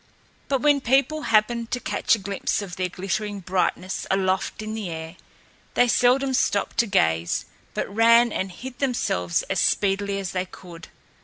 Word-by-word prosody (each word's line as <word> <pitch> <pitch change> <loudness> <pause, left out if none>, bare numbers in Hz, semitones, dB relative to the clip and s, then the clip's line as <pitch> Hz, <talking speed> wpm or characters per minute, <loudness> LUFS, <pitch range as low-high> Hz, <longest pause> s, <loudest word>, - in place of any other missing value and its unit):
But 270 -2 0
when 290 -2 +4
people 275 +5 +2
happened 225 +2 +2
to 250 - -2
catch - - +1
a - - -6
glimpse 200 0 -2
of 180 -3 -7
their 185 -1 -2
glittering 200 +3 -3
brightness, 185 0 -2
aloft 190 +2 0
in 215 0 -5
the 215 -4 -4
air, 160 +1 -7 0.6
they 245 - +4
seldom 260 +3 +3
stopped 205 -5 0
to 235 - +4
gaze, 85 - +1 0.3
but - - -1
ran 230 +3 +5
and 190 0 -3
hid 250 +6 -9
themselves 160 - 0
as - - -2
speedily 200 0 +1
as 195 -2 -4
they 185 0 -2
could. 170 -3 -12
200 Hz, 165 wpm, -24 LUFS, 185-240 Hz, 0.6 s, ran